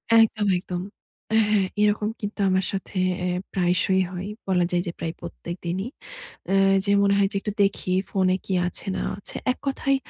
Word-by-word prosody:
একদম, 225 -2 +4
একদম। 180 0 -4 0.5
এ - - +6
হ্যাঁ, 205 -2 +3 0.2
এরকম 210 0 +2
কিন্তু 205 0 -5
আমার 185 0 +2
সাথে 195 0 -5 0.3
এ - - +1 0.3
প্রায়শই 185 +1 +2
হয়। 185 +1 -5 0.2
বলা 180 -2 +3
যায় 175 0 +1
যে - - -1
প্রায় 165 -1 -3
প্রত্যেকদিনই। 175 +4 -5 0.6
অ্যা 195 - +2 0.3
যে 200 - +2
মনে 200 0 +4
হয় 200 -1 +3
যে, - - -2
একটু 210 - -3
দেখি 195 -2 0 0.2
ফোনে 185 -1 +2
কি 190 - -2
আছে 180 - -4
না - - -2
আছে। 205 - -7 0.2
এক - - -14
কথায় 275 0 +1
195 Hz, 180 wpm, -25 LUFS, 180-205 Hz, 0.6 s, এ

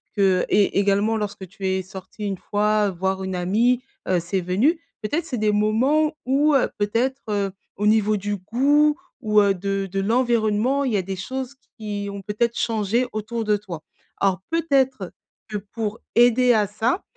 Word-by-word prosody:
que 190 -3 +3
et 200 -1 +3
également 205 +3 +2
lorsque 205 -2 -4
tu 190 +2 -6
es 190 0 0
sorti 190 +2 -10
une 195 -2 -2
fois 210 +1 +1
voir 190 +1 -2
une 190 0 -3
amie, 225 +8 +2 0.3
heu, 185 -1 +2
c'est 185 +3 -2
venu. 215 - +1 0.2
Peut-être 295 +10 -2
c'est 255 -7 -4
des 215 0 +2
moments 255 +10 +2
où 280 +3 +3
heu, 265 - +3
peut-être, 240 +6 0
heu, 200 -2 0 0.2
au 210 - -2
niveau 215 0 +3
du 205 0 -2
goût 285 - +2 0.2
ou 210 -3 +4
heu, 200 -1 +3
de 195 +1 -2
de 195 - -1
l'environnement 235 +3 +1
il 255 -5 -1
y - - +3
a - - +1
des 190 +1 -5
choses 260 +7 -5 0.2
qui 205 -2 -4
ont 200 - -7
peut-être 220 +4 -1
changé 225 +2 0
autour 220 +2 -3
de 210 -1 +2
toi. 180 -6 -8 0.4
Alors 190 -2 +1
peut-être 265 - +1 0.4
que 210 - -3
pour 210 +2 -5 0.2
aider 245 +1 +5
à 210 -3 +2
ça, 225 - -1
210 Hz, 180 wpm, -23 LUFS, 195-245 Hz, 0.4 s, aider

